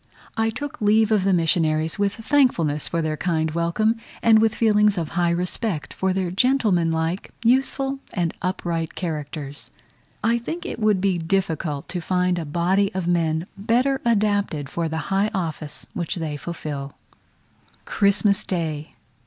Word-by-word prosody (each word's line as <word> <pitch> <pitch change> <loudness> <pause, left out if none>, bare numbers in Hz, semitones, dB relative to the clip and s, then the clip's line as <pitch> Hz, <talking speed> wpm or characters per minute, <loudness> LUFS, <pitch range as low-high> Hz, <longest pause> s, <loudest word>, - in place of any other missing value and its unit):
I 225 0 +1
took 275 +4 -6
leave 215 +1 +4
of 210 -3 +3
the 195 - +3
missionaries 160 -1 +1
with 200 -1 +1
thankfulness 220 - +1
for 165 -1 -1
their 155 -1 -1
kind 160 -1 0
welcome, 170 +8 +1 0.3
and 225 -1 +6
with 220 0 +2
feelings 210 -2 +3
of 165 -3 -2
high 175 -1 +1
respect 175 -2 -1
for 190 0 0
their 185 -2 -1
gentlemanlike, 180 -7 +1 0.2
useful, 270 +2 +2
and 170 -3 -1
upright 170 -3 -2
characters. 150 -4 -5 0.5
I 235 +2 +2
think 325 +9 -5
it - - -5
would 210 -4 +2
be 190 -3 +1
difficult 160 -4 -1
to 180 - -3
find 180 +1 +1
a 165 - -4
body 180 +6 +1
of 190 -2 -1
men 165 -2 +1
better 245 +7 +1
adapted 205 - +1
for 170 -1 -1
the 160 - -3 0.2
high 200 +2 +2
office 160 -5 -3
which 170 -3 -2
they 160 -4 -3
fulfil. 145 -3 -5 0.9
Christmas 200 0 +2
Day. 160 -4 -3
180 Hz, 150 wpm, -23 LUFS, 160-215 Hz, 0.9 s, and